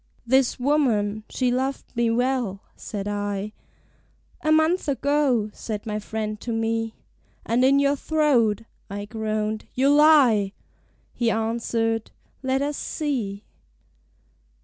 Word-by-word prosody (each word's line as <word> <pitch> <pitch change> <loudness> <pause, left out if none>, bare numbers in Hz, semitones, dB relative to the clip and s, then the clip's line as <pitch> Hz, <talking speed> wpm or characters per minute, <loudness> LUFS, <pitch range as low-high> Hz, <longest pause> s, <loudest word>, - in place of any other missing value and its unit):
"This 260 +1 +2
woman, 225 -7 +1
she 250 -2 0
loved 260 +1 -2
me 235 0 +2
well," 240 -4 0
said 205 -1 -6
I. 205 0 -3 0.9
"A 310 - +1
month 315 +3 +3
ago," 275 -6 +1
said 215 -1 -5
my 210 -1 -2
friend 215 -1 -4
to 240 - -4
me: 225 0 -1 0.5
"And 240 +2 +2
in 275 +2 +5
your 280 0 +3
throat," 265 -9 +2 0.3
I 205 +1 -5
groaned, 215 0 -2
"you 275 +3 +4
lie!" 270 -10 +5 0.6
He 235 -2 +1
answered,... 225 0 -1 0.3
"Let 265 +1 0
us 290 0 -2
see." 225 -10 -3
230 Hz, 120 wpm, -24 LUFS, 215-275 Hz, 0.9 s, in